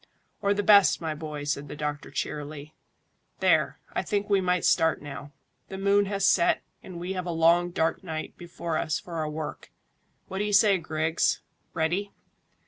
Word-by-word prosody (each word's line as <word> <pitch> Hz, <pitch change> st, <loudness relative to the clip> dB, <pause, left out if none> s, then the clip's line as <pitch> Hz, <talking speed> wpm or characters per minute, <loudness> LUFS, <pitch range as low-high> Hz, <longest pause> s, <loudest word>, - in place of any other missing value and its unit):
"Or 200 Hz, 0 st, +2 dB
the 205 Hz, -, 0 dB
best, 200 Hz, -1 st, +6 dB
my 160 Hz, -2 st, -3 dB
boy," 150 Hz, -1 st, -6 dB
said 145 Hz, 0 st, -2 dB
the 145 Hz, -, -7 dB
doctor 150 Hz, -1 st, -4 dB
cheerily. 150 Hz, 0 st, -5 dB, 0.7 s
"There, -, -, +3 dB, 0.2 s
I -, -, 0 dB
think 205 Hz, -1 st, -1 dB
we 195 Hz, -1 st, +4 dB
might 180 Hz, -1 st, +1 dB
start 160 Hz, 0 st, +3 dB
now. 145 Hz, 0 st, -8 dB, 0.4 s
The 190 Hz, -, -6 dB
moon 200 Hz, +1 st, +3 dB
has 195 Hz, -1 st, 0 dB
set, 175 Hz, -2 st, +3 dB, 0.2 s
and 180 Hz, -2 st, -9 dB
we 180 Hz, +2 st, -3 dB
have 185 Hz, -1 st, -4 dB
a -, -, -1 dB
long 170 Hz, +2 st, +4 dB
dark 165 Hz, +2 st, -1 dB
night 160 Hz, -3 st, -5 dB
before 170 Hz, -2 st, -4 dB
us 155 Hz, -, -1 dB
for 170 Hz, -2 st, -8 dB
our 155 Hz, -1 st, -1 dB
work. 150 Hz, -1 st, -6 dB, 0.6 s
What 190 Hz, -, -5 dB
do -, -, +1 dB
you 210 Hz, 0 st, -2 dB
say, 200 Hz, -2 st, +5 dB
Griggs? 160 Hz, 0 st, 0 dB, 0.3 s
Ready?" 175 Hz, +5 st, 0 dB
170 Hz, 180 wpm, -27 LUFS, 155-195 Hz, 0.7 s, best